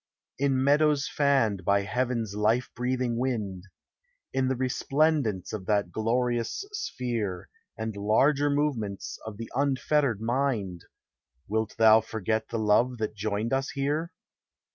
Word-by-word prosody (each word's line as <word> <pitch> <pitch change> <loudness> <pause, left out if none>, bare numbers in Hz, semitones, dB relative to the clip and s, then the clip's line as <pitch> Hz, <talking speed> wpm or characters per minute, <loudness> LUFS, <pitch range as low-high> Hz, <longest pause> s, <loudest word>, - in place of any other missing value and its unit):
In 135 -1 +2
meadows 145 0 +3
fanned 130 -9 +1
by 100 +3 +3
heaven's 115 +1 -1
life 110 +4 +1
breathing 125 -1 -1
wind. 105 -8 -2 0.7
In 130 -1 +1
the 130 - +1
resplendence 130 - 0
of 100 -4 -5
that 100 -4 +1
glorious 120 - -1
sphere, 120 - -3 0.3
And 110 -1 -4
larger 135 +8 +3
movements 135 -9 -2
of 105 -2 -7
the 115 +1 -7
unfettered 140 -2 +1
mind, 115 -7 -1 0.6
Wilt 110 +1 -1
thou 110 0 +7
forget 110 0 -2
the 115 - -2
love 115 +4 +2
that 110 -1 -2
joined 105 +3 -2
us 135 +1 0
here? 150 +5 -1
115 Hz, 125 wpm, -27 LUFS, 105-135 Hz, 0.7 s, thou